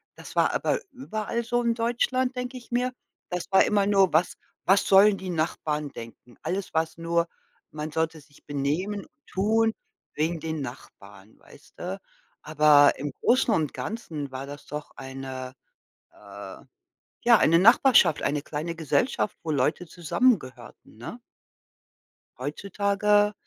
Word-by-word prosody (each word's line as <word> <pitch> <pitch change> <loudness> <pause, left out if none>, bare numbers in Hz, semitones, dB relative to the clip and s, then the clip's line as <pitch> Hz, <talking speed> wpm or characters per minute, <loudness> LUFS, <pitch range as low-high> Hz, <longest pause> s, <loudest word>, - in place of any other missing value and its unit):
das - - -12
war - - +3
aber - - 0
überall 235 -3 -4
so 240 +1 0
in 235 0 +2
Deutschland, 250 +2 0
denke 250 +1 -4
ich 240 -1 -14
mir. 250 +1 0 0.4
Das 180 -1 -3
war 190 - +6
immer 205 -1 +2
nur: 195 -2 +4
„Was 170 +3 +2 0.3
was 195 +2 +4
sollen 195 +1 +6
die 190 -1 -7
Nachbarn 155 -3 -2
denken?“ 120 -1 -12
Alles 190 +1 -3
war's 160 0 -1
nur 170 0 0 0.4
man 155 0 -5
sollte 160 0 -2
sich 145 0 -23
benehmen 150 +9 -2
und 305 -2 -31
tun 220 +3 +2 0.4
wegen 160 +2 -1
den 160 -1 -4
Nachbarn, 105 -5 -11
weißte? 180 +6 -9 0.4
Aber 150 -2 +5
im 145 +2 -4
Großen 250 -2 +3
und 155 -7 0
Ganzen 155 - -5
war 130 +1 -6
das 145 +1 -9
doch 150 +1 -6
eine 130 -1 -7 0.6
äh, - - -11 0.7
ja, 235 -2 +7
eine 165 +2 +4
Nachbarschaft, 230 - +5
eine 145 0 0
kleine 155 +3 -4
Gesellschaft, 175 - 0
wo 160 - -2
Leute 150 +5 0
zusammengehörten, 175 - -1
ne? - - -8 1.2
Heutzutage 200 +7 +1
170 Hz, 140 wpm, -26 LUFS, 150-215 Hz, 1.2 s, ja